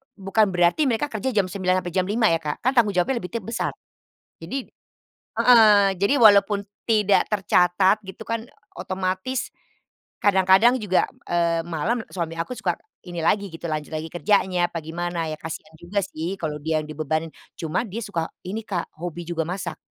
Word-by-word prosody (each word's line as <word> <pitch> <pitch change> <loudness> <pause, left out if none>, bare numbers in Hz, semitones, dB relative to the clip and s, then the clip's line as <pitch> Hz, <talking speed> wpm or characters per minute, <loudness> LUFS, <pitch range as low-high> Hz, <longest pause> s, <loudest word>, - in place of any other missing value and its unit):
bukan 205 +2 +2
berarti 180 - +2
mereka 260 +5 0
kerja 220 +4 -3
jam 190 -3 +1
9:00 185 -1 0
sampai 175 - -5
jam 185 +1 0
5:00 220 -1 +2
ya 165 - +2
Kak, 150 -2 -5
kan 255 - +3
tanggung 230 -7 +3
jawabnya 235 +8 +1
lebih 180 - -8
teb 225 - -2
besar. 230 +3 -3 0.7
Jadi 260 +10 -4 0.7
heeh, 210 -5 +7
jadi 200 +7 +3
walaupun 205 -4 +5 0.2
tidak 210 -3 +3
tercatat 190 0 +3
gitu 190 - -8
kan, 230 +1 -4 0.3
otomatis, 190 +7 -2 0.7
kadang-kadang 195 +4 +5
juga, 185 -3 +2 0.2
eee, 170 -1 +2
malam, 190 +9 -1
suami 165 -3 -3
aku 170 +9 -3
suka 220 - -1 0.3
ini 175 -1 -5
lagi 200 +4 +2
gitu, 165 - -10
lanjut 155 0 -4
lagi 155 +1 -4
kerjanya, 180 -1 +2
apa 165 - -4
gimana, 170 +1 -3
ya 155 - -5
kasihan 160 -1 -7
juga 185 +4 -2
sih 170 +2 -4
kalau 150 -2 -2
dia 160 0 0
yang 150 - -10
dibebanin, 155 +1 -2 0.3
cuman 160 +8 -1
dia 215 +5 -5
suka 170 -6 -3 0.2
ini 205 +4 -3
Kak, 180 -4 -3
hobi 175 0 -5
juga 165 -2 -1
masak. 180 -2 -4
185 Hz, 170 wpm, -23 LUFS, 170-210 Hz, 0.7 s, heeh